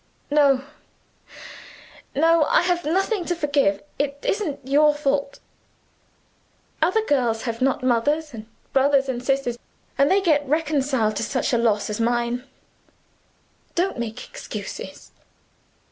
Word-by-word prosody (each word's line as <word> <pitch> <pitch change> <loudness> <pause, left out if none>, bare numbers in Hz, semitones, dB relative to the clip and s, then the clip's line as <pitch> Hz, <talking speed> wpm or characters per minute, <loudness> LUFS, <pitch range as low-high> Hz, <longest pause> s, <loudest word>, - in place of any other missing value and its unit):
"No 280 -3 +4 1.5
no; 325 +2 +4
I - - +3
have 350 -2 0
nothing 385 +5 0
to 350 - -1
forgive. 280 -11 +1 0.2
It 280 0 -1
isn't 300 - -2
your 295 +2 +4
fault. 280 -1 -1 1.4
Other 370 +7 +2
girls 240 - +1
have 230 -1 -4
not 265 -1 +1
mothers 290 +5 +1
and 220 -1 -9 0.3
brothers 275 0 +3
and 250 -2 -3
sisters 260 -3 -1 0.4
and 280 +1 +5
get 305 -5 +3
reconciled 275 -7 0
to - - -1
such 260 +2 -1
a 240 - +3
loss 220 -3 +1
as 210 0 -4
mine. 240 +2 0 1.3
Don't 360 -5 0
make 235 +1 -5
excuses." - - -8
275 Hz, 120 wpm, -23 LUFS, 240-305 Hz, 1.5 s, and